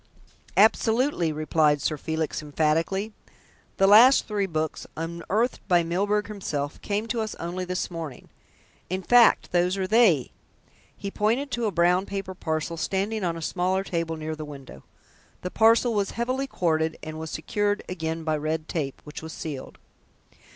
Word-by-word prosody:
"Absolutely," 220 - +3
replied 155 -1 +2
Sir 155 - -1
Felix 160 +1 -3
emphatically. 165 +8 0 0.6
"The 195 - +4
last 230 +7 +7
three 205 -2 -1
books, 155 -3 -3
unearthed 170 +9 -1
by 175 -3 +4
Mr. - - -6
Milburgh 205 +4 +1
himself, 150 -9 -4
came 210 +1 -2
to 230 0 -2
us 215 -1 -4
only 175 +2 -4
this 180 +1 -3
morning. 160 -6 -7 0.6
In 185 +1 -2
fact, 240 +4 +5
those 180 +2 +2
are 190 - -1
they," 195 - +4 0.7
he 200 - -5
pointed 235 +8 0
to 235 -2 0
a - - -1
brown 180 +2 +2
paper 195 -1 -4
parcel 160 -1 -3
standing 200 +5 -1
on 170 -2 -1
a 165 - -6
smaller 185 +3 0
table 165 -3 -2
near 155 0 -4
the 155 - -7
window. 135 - -10 0.6
The 180 - -3
parcel 230 +2 +4
was 200 -2 0
heavily 255 +3 -1
corded 160 -7 0
and 155 0 -6
was 160 0 -5
secured 205 +6 -1
again 165 -2 -3
by 155 -1 0
red 155 +1 -2
tape, 140 -5 -3
which 150 - -8
was 160 0 -8
sealed. 145 -5 -7
180 Hz, 160 wpm, -26 LUFS, 160-210 Hz, 0.7 s, last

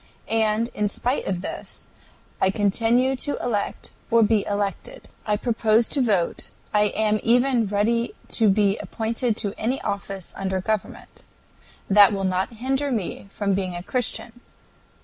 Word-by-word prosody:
And, 225 +1 +1
in 210 - 0
spite 250 +6 -2
of 185 -2 -1
this, - - -7 0.6
I 190 - +4
continue 230 +6 +2
to 285 +3 -1
elect 215 -4 -3 0.2
or 230 0 +5
be 210 -1 +3
elected, 205 - -3 0.2
I 210 -1 +2
propose 225 -1 +2
to 280 - +2
vote, 200 -8 0 0.2
I 210 0 +4
am 215 -1 +2
even 245 -1 +3
ready 225 +4 0
to 220 -3 +3
be 200 0 +2
appointed 230 0 -2
to 205 -3 -3
any 250 +5 0
office 195 -2 -4
under 190 -1 -2
government. 215 +2 -4 0.6
That 205 +1 +7
will 195 -1 -2
not 185 +3 0
hinder 270 +5 -1
me 200 -3 -3
from 200 0 -1
being 185 -2 -2
a 175 - -6
Christian. 245 +1 -2
215 Hz, 150 wpm, -24 LUFS, 200-235 Hz, 0.6 s, That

